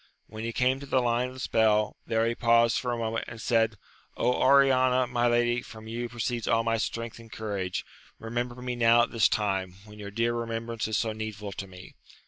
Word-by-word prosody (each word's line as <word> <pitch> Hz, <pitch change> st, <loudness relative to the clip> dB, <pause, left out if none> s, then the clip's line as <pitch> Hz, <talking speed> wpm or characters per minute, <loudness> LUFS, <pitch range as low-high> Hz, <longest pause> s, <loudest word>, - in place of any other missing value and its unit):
When 110 Hz, +1 st, -8 dB
he 115 Hz, -, -2 dB
came 130 Hz, +3 st, +1 dB
to 140 Hz, -, -9 dB
the 135 Hz, -, +1 dB
Une 120 Hz, 0 st, +1 dB
of 130 Hz, -, -10 dB
the -, -, -10 dB
spell, 110 Hz, -3 st, +2 dB
there 115 Hz, 0 st, +1 dB
he 115 Hz, -, +1 dB
paused 115 Hz, 0 st, +3 dB
for 125 Hz, -, -2 dB
a 120 Hz, -, -2 dB
moment, 115 Hz, 0 st, -2 dB
and 115 Hz, -, -9 dB
said, 115 Hz, -1 st, +2 dB, 0.4 s
Oriana, 130 Hz, 0 st, +4 dB
my 120 Hz, -1 st, 0 dB
lady, 120 Hz, 0 st, +2 dB
from 110 Hz, -1 st, -12 dB
you 120 Hz, +1 st, -4 dB
proceeds 120 Hz, 0 st, -3 dB
all 115 Hz, 0 st, +3 dB
my 115 Hz, 0 st, +1 dB
strength 115 Hz, +1 st, -4 dB
and 115 Hz, -1 st, -14 dB
courage! 100 Hz, -4 st, -3 dB, 0.3 s
remember 120 Hz, +2 st, -4 dB
me 125 Hz, -1 st, -3 dB
now 120 Hz, 0 st, +5 dB
at -, -, -3 dB
this 115 Hz, -3 st, +3 dB
time, 95 Hz, -3 st, -1 dB
when 105 Hz, 0 st, -13 dB
your 100 Hz, -1 st, -6 dB
dear 115 Hz, +3 st, 0 dB
remembrance 115 Hz, -1 st, -3 dB
is 110 Hz, -2 st, 0 dB
so 115 Hz, -, 0 dB
needful 110 Hz, -2 st, -6 dB
to 95 Hz, +1 st, -6 dB
me 90 Hz, -1 st, -13 dB
115 Hz, 210 wpm, -28 LUFS, 110-120 Hz, 0.4 s, now